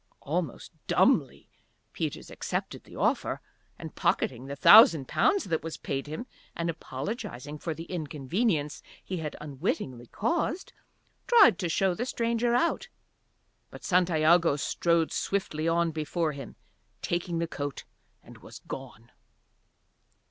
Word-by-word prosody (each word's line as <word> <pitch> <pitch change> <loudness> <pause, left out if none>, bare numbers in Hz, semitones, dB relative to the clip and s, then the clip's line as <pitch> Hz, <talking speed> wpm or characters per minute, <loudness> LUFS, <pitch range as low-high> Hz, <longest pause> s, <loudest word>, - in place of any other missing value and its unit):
Almost 160 -2 -3 0.2
dumbly - - +2 0.5
Peters - - -4
accepted - - -4
the - - -14
offer - - 0 0.4
and, - - -8
pocketing 125 +1 0
the 140 - -5
thousand 160 - +8
pounds 400 -1 +2
that 165 -3 -1
was 165 0 -6
paid 135 +1 -4
him, 155 +11 -5 0.3
and 170 0 -1
apologizing 150 - -6
for 160 0 -4
the 165 - -7
inconvenience 155 - -2 0.2
he 185 - -4
had 155 -3 -5
unwittingly 135 - -3
caused, 340 - -2 0.5
tried 420 - +6
to 175 -4 -1
show 190 +3 +2
the 240 +8 -3
stranger 235 0 0
out. 295 +8 0 0.8
But - - -12
Santiago 170 -3 +3
strode 165 +3 +1
swiftly 165 -5 -2
on 170 0 +2
before 160 +1 -1
him, 140 -5 -9 0.5
taking 175 0 -1
the 170 - 0
coat, 145 -4 -5 0.4
and - - -14
was - - -12
gone. 125 -3 -9
165 Hz, 125 wpm, -28 LUFS, 145-185 Hz, 0.8 s, thousand